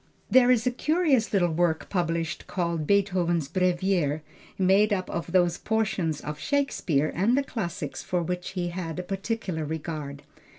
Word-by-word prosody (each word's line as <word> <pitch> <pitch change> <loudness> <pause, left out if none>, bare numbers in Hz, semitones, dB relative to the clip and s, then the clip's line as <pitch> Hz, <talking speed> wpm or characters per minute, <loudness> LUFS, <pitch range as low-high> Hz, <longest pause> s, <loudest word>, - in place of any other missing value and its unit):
There 255 -1 +6
is 240 -3 +3
a 250 - +2
curious 295 -2 +2
little 175 -4 +2
work 160 0 +1
published 170 -2 -2
called 170 -4 -2
Beethoven's 180 -6 +2
Brevier, 180 -4 +1 0.3
made 195 +3 +4
up 185 -3 0
of 170 0 -4
those 175 -2 +3
portions 195 -9 -1
of 150 0 -6
Shakespeare 175 - 0
and 220 +9 +2
the 280 - +2
classics 175 - -4
for 180 -1 -1
which 180 +1 -4
he 175 -1 -1
had 170 -2 -5
a 180 - -3
particular 195 -3 -3
regard. 150 -2 -5
180 Hz, 155 wpm, -26 LUFS, 165-205 Hz, 0.3 s, There